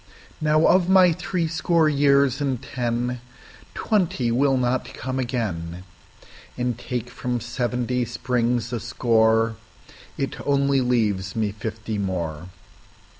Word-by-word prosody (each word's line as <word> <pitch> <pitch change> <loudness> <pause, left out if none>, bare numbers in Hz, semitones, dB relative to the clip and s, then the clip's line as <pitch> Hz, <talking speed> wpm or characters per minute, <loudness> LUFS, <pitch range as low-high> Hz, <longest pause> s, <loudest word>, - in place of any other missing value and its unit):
Now, 155 +1 +3
of 185 -1 +4
my 185 -2 +6
threescore 165 -1 0
years 140 -2 +3
and 135 -4 -1
ten, 120 0 -3 0.5
Twenty 170 - 0
will 135 +2 +2
not 125 0 -1
come 130 +2 -4
again, 95 -9 -3 0.7
And 125 -1 -1
take 120 0 -4
from 125 -1 -3
seventy 125 +1 -1
springs 120 -1 -1
a 120 - -1
score, 115 +1 +2 0.6
It 135 - -3
only 140 -1 +2
leaves 105 -6 0
me 110 -2 0
fifty 110 0 -5
more. 85 -4 -3
125 Hz, 115 wpm, -23 LUFS, 115-140 Hz, 0.7 s, my